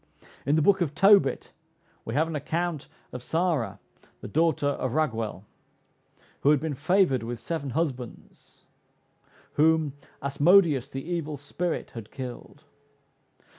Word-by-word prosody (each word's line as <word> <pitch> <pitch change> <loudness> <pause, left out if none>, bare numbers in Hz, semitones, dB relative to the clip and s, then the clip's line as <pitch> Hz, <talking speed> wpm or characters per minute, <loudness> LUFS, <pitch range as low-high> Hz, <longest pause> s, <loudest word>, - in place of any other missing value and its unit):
In 145 - +4
the 155 - +3
book 195 +2 +4
of 150 -4 -1
Tobit 195 -7 +4 0.5
we 115 - -4
have 160 +3 +2
an 165 - -4
account 165 +1 -2 0.2
of 125 - -7
Sara, 160 -3 -1 0.4
the - - -6
daughter 155 +3 +1
of 130 -3 -2
Raguel, 115 -10 -1 1.0
who 140 - +3
had 150 -2 +5
been 160 0 -3
favored 155 - +2
with 115 0 -5
seven 145 +2 -4
husbands, 130 -4 -5 1.0
whom 160 -2 +3 0.3
"Asmodeus 145 0 +4
the 135 +2 -6
evil 160 -4 -3
spirit 165 +5 -3
had 115 -3 -9
killed." 130 +3 -8
150 Hz, 130 wpm, -27 LUFS, 130-165 Hz, 1.0 s, had